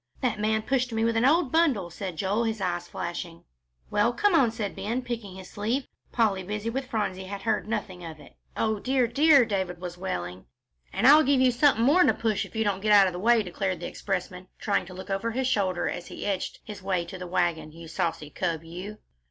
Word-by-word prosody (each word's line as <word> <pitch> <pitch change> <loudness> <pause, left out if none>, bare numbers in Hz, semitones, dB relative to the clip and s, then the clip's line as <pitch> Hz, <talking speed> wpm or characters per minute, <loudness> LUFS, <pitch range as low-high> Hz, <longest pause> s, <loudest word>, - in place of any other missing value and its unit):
"That 245 -5 0
man 215 +1 +1
pushed 255 -1 0
me 225 0 0
with 230 0 +1
an 225 +2 +3
old 300 -1 +3
bundle," 265 - +2
said 185 0 -5
Joel, 205 +6 0
his 220 -1 -2
eyes 175 -2 -2
flashing. 170 -1 -6 0.5
"Well, 210 +4 +2
come 410 +9 +2
on," 270 -8 +5
said 220 -3 -4
Ben, 235 +5 -2
picking 230 -6 -5
his 190 -1 -10
sleeve. 230 +6 -1 0.3
Polly, 215 -5 +1
busy 210 +4 -3
with 265 +2 -3
Phronsie, 205 -6 -2
had 195 +1 -7
heard 225 - 0
nothing 200 -5 -4
of 160 -2 -8
it. - - -16 0.2
"O 220 -1 0
dear, 255 +2 +2
dear!" 280 +1 +5
David 190 -5 -2
was 175 -1 -7
wailing. 90 - -5 0.4
"And - - -1
I'll 295 +4 +9
give 280 -2 +3
you 255 -1 +5
something 240 -2 +3
more'n 355 +7 +5
a - - +2
push 220 -3 0
if - - -20
you 220 - +1
don't 200 -2 -1
get 215 +1 +1
out 200 -1 +8
of 185 - -1
the 180 - -5
way," 230 +2 +4
declared 185 -1 -2
the 175 - -6
expressman, 185 -1 -4
trying 200 -3 0
to 185 - -10
look 190 +1 -8
over 195 +4 -1
his 255 +3 -1
shoulder 190 -7 0
as 175 - -4
he - - -7
edged 200 -2 -3
his 210 -2 -9
way 185 -2 -1
to 185 +2 -9
the 180 - -6
wagon, 175 -3 0
"you 165 +1 -11
saucy 160 -3 -3
cub, 165 -3 -2
you!" 180 +6 -8
205 Hz, 225 wpm, -27 LUFS, 180-235 Hz, 0.5 s, I'll